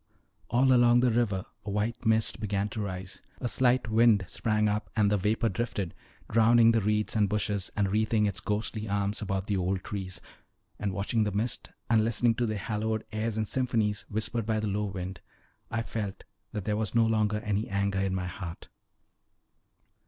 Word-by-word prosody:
All 130 Hz, +2 st, +4 dB
along 120 Hz, 0 st, +5 dB
the 125 Hz, -1 st, +3 dB
river 110 Hz, -5 st, 0 dB, 0.2 s
a 105 Hz, -, -6 dB
white 110 Hz, +4 st, -2 dB
mist 110 Hz, 0 st, +3 dB
began 105 Hz, -1 st, -1 dB
to 110 Hz, -, -4 dB
rise, 95 Hz, -1 st, -6 dB, 0.2 s
a 125 Hz, -, -2 dB
slight 125 Hz, 0 st, +2 dB
wind 110 Hz, -3 st, +4 dB
sprang 105 Hz, +2 st, 0 dB
up 105 Hz, -1 st, -1 dB
and 105 Hz, -2 st, +3 dB
the 105 Hz, -, +3 dB
vapor 110 Hz, +4 st, +1 dB
drifted, 105 Hz, -7 st, -3 dB, 0.3 s
drowning 115 Hz, +1 st, +5 dB
the 115 Hz, -1 st, +2 dB
reeds 105 Hz, +2 st, +1 dB
and 105 Hz, -2 st, +3 dB
bushes, 105 Hz, -2 st, -1 dB
and 105 Hz, -1 st, +2 dB
wreathing 110 Hz, 0 st, +2 dB
its 100 Hz, -2 st, -1 dB
ghostly 105 Hz, 0 st, -2 dB
arms 100 Hz, +1 st, 0 dB
about 95 Hz, -2 st, -2 dB
the 100 Hz, -1 st, 0 dB
old 95 Hz, +1 st, -1 dB
trees: 95 Hz, -3 st, -5 dB, 0.6 s
and 100 Hz, -2 st, -1 dB
watching 105 Hz, +4 st, 0 dB
the 105 Hz, -, -1 dB
mist, 110 Hz, +4 st, -2 dB, 0.2 s
and 115 Hz, -2 st, +4 dB
listening 115 Hz, +1 st, +2 dB
to 120 Hz, +1 st, -1 dB
the 110 Hz, -1 st, -2 dB
"hallowed 110 Hz, +2 st, -2 dB
airs 110 Hz, 0 st, -2 dB
and 110 Hz, -1 st, 0 dB
symphonies" 115 Hz, -5 st, 0 dB
whispered 110 Hz, +1 st, -2 dB
by 110 Hz, -1 st, +1 dB
the 110 Hz, -, -2 dB
low 105 Hz, +1 st, -1 dB
wind, 95 Hz, -2 st, -5 dB, 0.5 s
I 115 Hz, 0 st, -1 dB
felt 105 Hz, -4 st, -5 dB, 0.3 s
that 105 Hz, -2 st, -4 dB
there 105 Hz, -1 st, 0 dB
was 110 Hz, +1 st, -1 dB
no 115 Hz, -1 st, +5 dB
longer 110 Hz, -1 st, +1 dB
any 105 Hz, +1 st, -1 dB
anger 100 Hz, 0 st, 0 dB
in 95 Hz, -1 st, 0 dB
my 95 Hz, -1 st, -2 dB
heart. 90 Hz, -1 st, -7 dB
105 Hz, 185 wpm, -29 LUFS, 100-115 Hz, 0.6 s, along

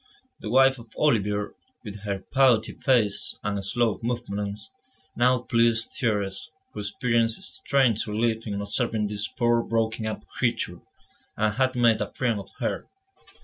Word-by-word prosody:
The 105 Hz, -, -6 dB
wife 135 Hz, +2 st, +5 dB
of 115 Hz, -1 st, -15 dB
Olivier, 105 Hz, -7 st, +1 dB, 0.3 s
with 105 Hz, -2 st, -8 dB
her 100 Hz, -2 st, -3 dB
putty 130 Hz, -5 st, +4 dB
face 115 Hz, -6 st, +1 dB
and 100 Hz, -1 st, -2 dB
slow 115 Hz, +2 st, 0 dB
movements, 105 Hz, -4 st, -4 dB, 0.4 s
now 125 Hz, +1 st, +3 dB
pleased 115 Hz, -1 st, +3 dB
Thérèse, 105 Hz, +1 st, -1 dB, 0.2 s
who -, -, -6 dB
experienced 115 Hz, +2 st, 0 dB, 0.2 s
strange 130 Hz, -7 st, +2 dB
relief 110 Hz, +1 st, -1 dB
in 100 Hz, -1 st, -3 dB
observing 105 Hz, +1 st, -1 dB
this 105 Hz, 0 st, -3 dB
poor, 120 Hz, 0 st, +1 dB
broken 110 Hz, -1 st, -1 dB
up 110 Hz, -, -5 dB
creature, -, -, -2 dB, 0.6 s
and 110 Hz, 0 st, +1 dB
had 130 Hz, +2 st, +1 dB
made 115 Hz, -3 st, +4 dB
a 105 Hz, -, -3 dB
friend 115 Hz, -5 st, 0 dB
of 100 Hz, -, -10 dB
her. -, -, -3 dB
115 Hz, 145 wpm, -26 LUFS, 105-120 Hz, 0.6 s, wife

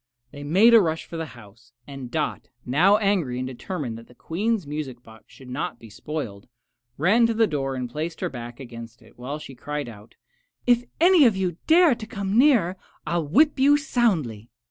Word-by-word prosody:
They 145 Hz, -, -10 dB
made 190 Hz, +11 st, +5 dB
a 230 Hz, -, +8 dB
rush 160 Hz, -3 st, -2 dB
for -, -, -10 dB
the 165 Hz, -1 st, -4 dB
house, 115 Hz, +2 st, -17 dB
and 135 Hz, -3 st, -8 dB
Dot, 155 Hz, +2 st, -3 dB, 0.2 s
now 175 Hz, +11 st, +4 dB
angry 195 Hz, -, 0 dB
and 130 Hz, 0 st, -3 dB
determined 130 Hz, -2 st, -5 dB
that 115 Hz, -, -15 dB
the 125 Hz, -, -19 dB
Queen's 205 Hz, -, -2 dB
music 140 Hz, -4 st, -6 dB
box 110 Hz, -1 st, -16 dB
should 130 Hz, -, -15 dB
not 125 Hz, -1 st, -4 dB
be 115 Hz, -2 st, -14 dB
spoiled, 110 Hz, -5 st, -6 dB, 0.5 s
ran 215 Hz, +10 st, +4 dB
to 230 Hz, -, -1 dB
the 225 Hz, 0 st, +4 dB
door 135 Hz, -7 st, -2 dB
and 125 Hz, -1 st, -3 dB
placed 155 Hz, +7 st, -5 dB
her -, -, -1 dB
back 120 Hz, -1 st, -9 dB
against 120 Hz, -2 st, -10 dB
it, 115 Hz, -, -21 dB
while 135 Hz, +4 st, -5 dB
she 145 Hz, -3 st, -10 dB
cried 145 Hz, +2 st, -5 dB
out, 110 Hz, -1 st, -13 dB, 0.5 s
"If 245 Hz, 0 st, +3 dB
any 345 Hz, -2 st, +6 dB
of 220 Hz, -5 st, +3 dB
you 180 Hz, -3 st, -2 dB
dare 330 Hz, -2 st, +6 dB
to 220 Hz, -2 st, -8 dB
come 200 Hz, -2 st, -3 dB
nearer 230 Hz, -, +4 dB, 0.3 s
I 170 Hz, +2 st, 0 dB
will 155 Hz, -, -4 dB
whip 295 Hz, -, +3 dB
you 285 Hz, +2 st, +5 dB
soundly!" 170 Hz, -, -1 dB
155 Hz, 200 wpm, -24 LUFS, -, 0.5 s, a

